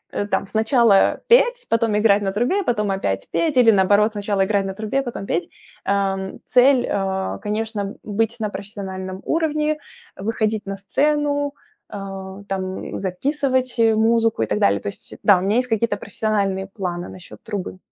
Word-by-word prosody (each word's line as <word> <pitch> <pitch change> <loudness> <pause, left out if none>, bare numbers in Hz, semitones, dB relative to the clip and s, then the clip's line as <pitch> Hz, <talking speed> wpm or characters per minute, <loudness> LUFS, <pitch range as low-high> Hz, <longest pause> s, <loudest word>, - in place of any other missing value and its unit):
у 205 - -1
там 195 - 0
сначала 220 -1 +3
петь, - - +4
потом 225 -2 +2
играть 210 -1 +4
на 195 -1 -1
трубе, 245 - 0
потом 210 - 0
опять 100 - -2
петь 315 -5 0
или, 235 -3 +7
наоборот, 205 +2 +3
сначала 205 -2 0
играть 200 0 +1
на 195 - -3
трубе, 215 +7 -1
потом 240 -6 -5
петь, 170 -2 -2 0.3
ам. 195 -1 -1
Цель, 255 0 +4
а, 190 -1 -1
конечно, 210 -1 -3
быть 225 +2 -1
на 215 -1 -1
профессиональном 190 -2 -6
уровне, 305 -1 0 0.4
выходить 215 +1 -1
на 195 0 -4
сцену, 285 +7 0 0.4
а, 195 -1 -7
там 190 -1 -4
записывать 260 +6 -1
музыку 225 - +3
и - - +1
так 105 - -1
далее. 100 0 +3
То - - -7
есть 100 - -8
да. 205 -3 +6
У - - -2
меня 200 +4 +1
есть 250 0 +1
какие-то 225 -1 0
профессиональные 200 -3 -1
планы 180 -4 -5
насчет 185 -1 -12
трубы. 205 -4 -5
210 Hz, 160 wpm, -21 LUFS, 195-235 Hz, 0.4 s, или